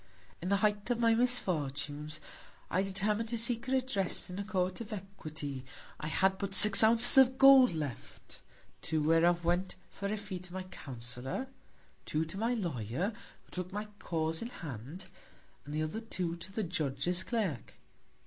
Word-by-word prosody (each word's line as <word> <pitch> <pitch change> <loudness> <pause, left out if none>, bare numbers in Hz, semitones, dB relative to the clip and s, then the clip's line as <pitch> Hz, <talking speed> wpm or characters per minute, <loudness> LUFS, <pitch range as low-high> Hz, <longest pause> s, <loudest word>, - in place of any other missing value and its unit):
In 180 - -3
the 200 - +3
Height 210 +1 0
of 245 - +1
my 230 -1 +3
Misfortunes, 155 - 0 0.5
I 185 - +2
determin'd 205 +3 0
to 235 - 0
seek 235 +2 0
Redress 255 -9 0
in 180 - -6
a - - -2
Court 185 -1 -2
of 225 - -8
Equity: 155 -9 -7 0.4
I 150 - -4
had 190 +4 +1
but 195 -1 -3
six 210 +2 +9
Ounces 230 +4 +6
of 260 0 +5
Gold 270 -6 +7
left: 145 -6 -7 0.4
Two 155 -1 -1
whereof 170 +2 +3
went 175 +2 0 0.2
for 200 - -5
a 215 - -1
Fee 200 -3 -6
to 180 0 -11
my 185 0 -4
Counsellor; 130 - -4 0.6
two 155 +1 0
to 165 - -7
my 235 +3 +1
Lawyer, 160 - -2 0.3
who - - -26
took 180 0 -4
my 210 +2 -4
Cause 160 -1 -2
in 235 - -4
Hand, 150 - -8 0.6
and 145 - -7
the 155 - 0
other 160 +9 -4
two 180 -7 -3
to 170 +2 -9
the 215 +2 -2
Judge's 160 +2 -1
Clerk. 195 - -3
185 Hz, 170 wpm, -32 LUFS, 155-215 Hz, 0.6 s, six